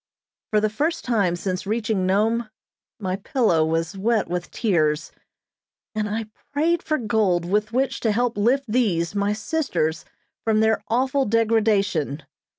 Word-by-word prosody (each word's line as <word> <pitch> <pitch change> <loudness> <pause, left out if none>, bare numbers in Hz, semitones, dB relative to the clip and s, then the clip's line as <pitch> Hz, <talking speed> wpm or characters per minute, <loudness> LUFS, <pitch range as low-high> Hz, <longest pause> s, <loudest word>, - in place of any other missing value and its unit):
For 215 - +3
the 215 0 0
first 310 +8 -1
time 205 -8 +1
since 185 +2 -3
reaching 215 -3 0
Nome, 220 +4 +1 0.5
my 190 -2 -2
pillow 195 - +2
was 165 +2 -1
wet 220 +2 +1
with 175 0 -3
tears, 155 -8 0 0.8
and 215 -1 -1
I 220 +2 -2 0.3
prayed 320 +4 +1
for 310 - 0
gold 210 - +1
with 210 +4 0
which 260 +3 0
to 225 - +1
help 240 +2 0
lift 250 +7 +2
these, 205 -8 +1
my 205 0 +1
sisters, 210 - -1 0.4
from 220 -1 +2
their 220 0 +2
awful 260 +3 +1
degradation. 205 - +1
215 Hz, 145 wpm, -23 LUFS, 185-235 Hz, 0.8 s, For